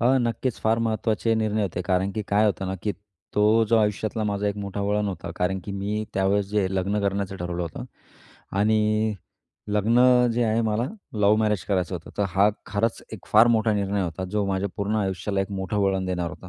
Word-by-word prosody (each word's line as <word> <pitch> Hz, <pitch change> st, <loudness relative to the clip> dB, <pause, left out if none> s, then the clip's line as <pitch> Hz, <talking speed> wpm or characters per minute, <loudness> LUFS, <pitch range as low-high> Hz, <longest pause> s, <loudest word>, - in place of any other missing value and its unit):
अ, 130 Hz, +3 st, +4 dB
नक्कीच 120 Hz, 0 st, -1 dB
फार 110 Hz, +1 st, +2 dB
महत्त्वाचे 110 Hz, 0 st, 0 dB
निर्णय 110 Hz, -1 st, 0 dB
होते, 90 Hz, -2 st, -2 dB
कारण 95 Hz, +1 st, 0 dB
की 110 Hz, -, -3 dB
काय 105 Hz, +2 st, +3 dB
होतं 95 Hz, -2 st, -1 dB
ना, 95 Hz, -, -2 dB
की 105 Hz, -, 0 dB, 0.4 s
तो 105 Hz, +2 st, +4 dB
जो 115 Hz, -, +4 dB
आयुष्यातला 110 Hz, +1 st, 0 dB
माझा 105 Hz, 0 st, -1 dB
एक 100 Hz, -, -3 dB
मोठा 100 Hz, 0 st, -4 dB
वळण 105 Hz, +1 st, 0 dB
होता 85 Hz, -3 st, -5 dB
कारण 95 Hz, +2 st, 0 dB
की 100 Hz, -, -5 dB
मी 100 Hz, +2 st, -2 dB
त्यावेळेस 95 Hz, +1 st, +1 dB
जे 105 Hz, -2 st, +1 dB
लग्न 100 Hz, +3 st, 0 dB
करण्याचं 100 Hz, -1 st, -1 dB
ठरवलं 90 Hz, -1 st, -3 dB
होतं 85 Hz, -2 st, -6 dB, 0.7 s
आणि 110 Hz, +1 st, +2 dB, 0.5 s
लग्न 105 Hz, +4 st, +2 dB, 0.3 s
जे 120 Hz, +1 st, +1 dB
आहे 110 Hz, 0 st, +1 dB
मला, 110 Hz, +2 st, 0 dB, 0.3 s
लव्ह 105 Hz, 0 st, +3 dB
मॅरेज 105 Hz, -5 st, +1 dB
करायचं 95 Hz, -2 st, 0 dB
होतं. 85 Hz, -2 st, -7 dB
तर 100 Hz, -, +2 dB
हा 95 Hz, +3 st, +4 dB, 0.2 s
खरंच 105 Hz, +3 st, -1 dB
एक 110 Hz, -, -9 dB
फार 110 Hz, +2 st, +6 dB
मोठा 110 Hz, 0 st, +1 dB
निर्णय 100 Hz, -1 st, 0 dB
होता, 85 Hz, +1 st, -4 dB
जो 100 Hz, +2 st, -1 dB
माझ्या 95 Hz, +1 st, -1 dB
पूर्ण 100 Hz, +2 st, -1 dB
आयुष्याला 95 Hz, 0 st, -1 dB
एक 95 Hz, -, -3 dB
मोठं 95 Hz, +1 st, -2 dB
वळण 95 Hz, -1 st, +1 dB
देणार 90 Hz, -2 st, -2 dB
होता. 95 Hz, -, -11 dB
100 Hz, 200 wpm, -25 LUFS, 95-110 Hz, 0.7 s, फार